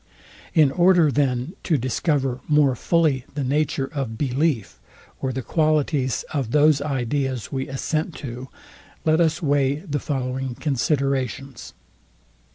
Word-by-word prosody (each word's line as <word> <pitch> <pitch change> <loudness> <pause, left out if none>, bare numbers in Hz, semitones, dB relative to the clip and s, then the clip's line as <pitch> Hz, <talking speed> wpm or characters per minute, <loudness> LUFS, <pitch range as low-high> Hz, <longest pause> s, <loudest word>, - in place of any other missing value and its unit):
In 150 -4 +5
order 175 -1 +4
then 130 +2 0
to 160 - +1
discover 130 +1 0
more 150 -4 +4
fully 155 -6 +1
the 145 - -1
nature 140 0 0
of 130 -7 -3
belief, 135 -3 -1 0.4
or 130 - -1
the 130 0 -4
qualities 150 -4 +1
of 135 -6 -1
those 150 +2 +4
ideas 135 -4 -2
we 135 -1 -3
assent 155 +5 -2
to, 125 -1 -7 0.6
let 160 +1 +3
us 160 0 +1
weigh 140 -2 +2
the 150 -1 -4
following 130 -2 -3
considerations. 135 -2 -2
140 Hz, 125 wpm, -23 LUFS, 130-155 Hz, 0.6 s, In